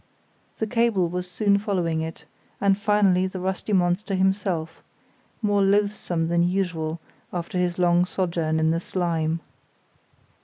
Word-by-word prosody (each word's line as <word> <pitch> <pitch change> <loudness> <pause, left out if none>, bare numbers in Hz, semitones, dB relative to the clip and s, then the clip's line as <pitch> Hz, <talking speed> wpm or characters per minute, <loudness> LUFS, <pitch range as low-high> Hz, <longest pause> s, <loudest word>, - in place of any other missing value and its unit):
The 220 - -1
cable 220 -6 +1
was 180 +1 -4
soon 200 +2 +2
following 175 -6 -1
it, 160 0 -6 0.3
and 200 -1 +3
finally 205 -3 +3
the 185 0 -6
rusty 190 +3 -3
monster 185 +2 +1
himself, 185 -4 0 0.6
more 205 -1 +2
loathsome 195 -4 +1
than 170 0 +2
usual, 175 -3 -1 0.3
after 180 +2 -3
his 175 -1 0
long 175 0 +3
sojourn 170 -4 -1
in 160 0 +2
the 165 - +1
slime. 165 -2 -1
180 Hz, 130 wpm, -24 LUFS, 170-200 Hz, 0.6 s, and